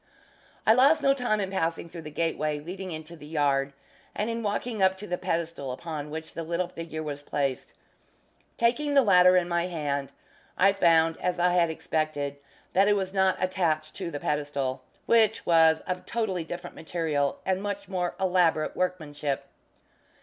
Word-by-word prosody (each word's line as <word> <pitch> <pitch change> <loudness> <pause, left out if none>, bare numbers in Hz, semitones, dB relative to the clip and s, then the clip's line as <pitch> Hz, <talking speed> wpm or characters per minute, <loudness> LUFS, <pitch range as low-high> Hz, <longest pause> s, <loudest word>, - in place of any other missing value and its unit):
I 220 - +7
lost 275 +6 +5
no 275 - +5
time 245 -5 0
in 195 -1 -2
passing 165 -3 -1
through 170 0 -9
the 155 - -8
gateway 155 -1 -1
leading 185 +5 -7
into 160 0 -7
the 150 -2 -12
yard, 140 -3 +1 0.4
and 215 +3 -1
in 230 0 -3
walking 215 +1 -2
up 190 0 +4
to 205 - -8
the 180 - -2
pedestal 165 -6 -3
upon 150 +2 -5
which 160 +1 -6
the - - -4
little 170 +2 -1
figure 165 -2 -6
was 145 -2 -5
placed. 140 -3 -2 0.8
Taking 285 +5 +1
the 275 - +7
latter 180 -3 +6
in 175 -1 +1
my 170 0 0
hand, 145 -5 -3 0.5
I 195 +1 +5
found, 165 -4 +3
as 180 0 -1
I 175 +1 +3
had 170 -2 +3
expected, 155 -3 -2 0.4
that 195 +2 +4
it 205 - +4
was 190 -1 -2
not 190 -1 +2
attached 165 -5 0
to 180 -3 -4
the 145 -3 -5
pedestal, 140 -3 -2 0.2
which 220 -2 +3
was 160 -1 +5
of 180 -1 -5
totally 205 -7 -1
different 175 +2 -7
material, 155 -4 -1
and 190 0 0
much 200 -1 -4
more 180 -2 -2
elaborate 180 -4 +2
workmanship. 150 -6 -2
170 Hz, 170 wpm, -27 LUFS, 155-190 Hz, 0.8 s, I